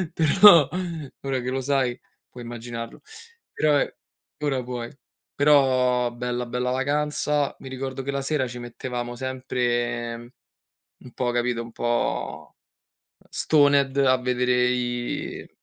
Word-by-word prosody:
Però, 165 -1 +7 0.5
ora 135 -1 -1
che 125 - -3
lo 130 +1 -1
sai, 130 -2 0 0.3
puoi 120 - -10
immaginarlo. 115 0 -7 0.5
Però, 150 -1 +2
e - - -2 0.5
ora 135 -3 0
puoi. 120 -1 -5 0.4
Però 130 -4 +3
bella, 125 0 -3
bella 125 +1 -2
vacanza, 145 +2 0
mi 135 - -9
ricordo 130 0 -5
che 135 - -3
la 140 0 -2
sera 135 -1 0
ci 125 +1 -8
mettevamo 120 0 -5
sempre 120 -2 -2 0.9
un 125 - -12
po' 125 -1 -1
capito, 120 -1 0
un 115 0 -9
po' 120 +1 -2 0.7
stoned 140 -3 +3
a 130 -2 +4
vedere 125 0 +1
i 120 -1 -3
125 Hz, 125 wpm, -24 LUFS, 120-135 Hz, 0.9 s, Però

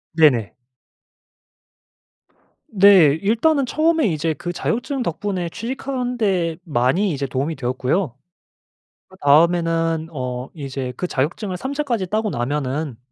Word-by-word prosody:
네네. 130 -10 +4 2.1
네. 190 -8 +6
일단은 255 +7 +2
처음에 315 0 +2
이제 160 -1 -1
그 175 +5 -5
자격증 245 +8 -2
덕분에 180 0 -3
취직하는 250 +3 -4
데 180 -7 0
많이 155 +8 +1
이제 140 -2 -2
도움이 140 +5 -2
되었고요. 130 +3 -1 0.9
그다음에는 165 0 +2
어 125 -2 -4
이제 135 -4 -5
그 180 - -3
자격증을 180 +8 -2
3 265 +8 -4
차까지 240 -10 -1
따고 215 +2 -1
나면은 135 +1 -2
170 Hz, 250 characters per minute, -21 LUFS, 140-215 Hz, 2.1 s, 네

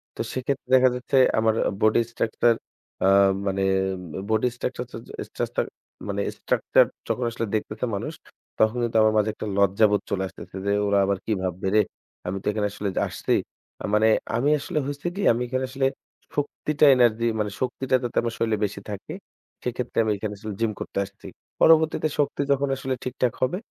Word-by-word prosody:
তো - - -4
সেক্ষেত্রে 130 0 -3
দেখা 130 0 +6
যাচ্ছে 125 +2 -1 0.2
আমার 110 0 +3 0.2
আ - - -3
body 110 +2 +4
structure 115 +1 +2 0.5
আ - - +5 0.4
মানে 95 0 0 0.3
উম 90 - -8 0.3
বডি 110 +3 +2
স্ট্রাকচারযা 125 -1 -4 0.3
স্ট্রাটচার - - -2 0.4
মানে 100 0 -1 0.2
structure - - +3 0.2
যখন 125 - -1
আসলে 115 0 -2
দেখতেছে 110 +3 -2
মানুষ 115 +11 -4 0.5
তখন 110 +2 +3
কিন্তু 115 -1 0
আমার 110 0 +4
মাঝে 105 0 +3
একটা 110 - -6
লজ্জাবোধ 100 +1 +4
চলে 95 -1 0
আসতেছে 95 - -12
যে 100 - +1 0.2
"ওরা 100 0 +3
আবার 100 -1 +1
কি 110 - -2
ভাববে 95 +1 -2
রে? 110 - +7 0.5
আমি 95 +2 -2
তো - - -19
এখানে 105 -1 0
আসলে 100 0 -3 0.2
আসছি" - - -2 0.5
আ - - -1
মানে 110 +1 +5 0.3
আমি 135 +5 +2
আসলে 145 - -4
হইছে 145 +3 -4
কি 200 - -3
আমি 120 +2 0
এখানে 130 +1 -1
আসলে 135 +1 -1 0.5
শক্তিটা 150 +1 +1
energy 115 -2 +3
মানে 105 -1 -1
শক্তিটা 130 0 0
যাতে 120 - -4
আমার 115 -1 -2
শরীরে 110 -2 +1
বেশি 100 0 -5
থাকে 100 -1 -6 0.5
সেক্ষেত্রে 125 0 -4
আমি 110 - +1
এখানে 105 +1 -4
আসলে 105 0 -6
gym 115 - +2
করতে - - -6
আসছি। 100 +1 -17 0.4
পরবর্তীতে 160 -1 +5
শক্তি 145 0 +1
যখন 140 0 +2
আসলে 135 0 -3
ঠিকঠাক 125 -1 -1
হবে 130 +8 +1
115 Hz, 175 wpm, -25 LUFS, 105-130 Hz, 0.5 s, রে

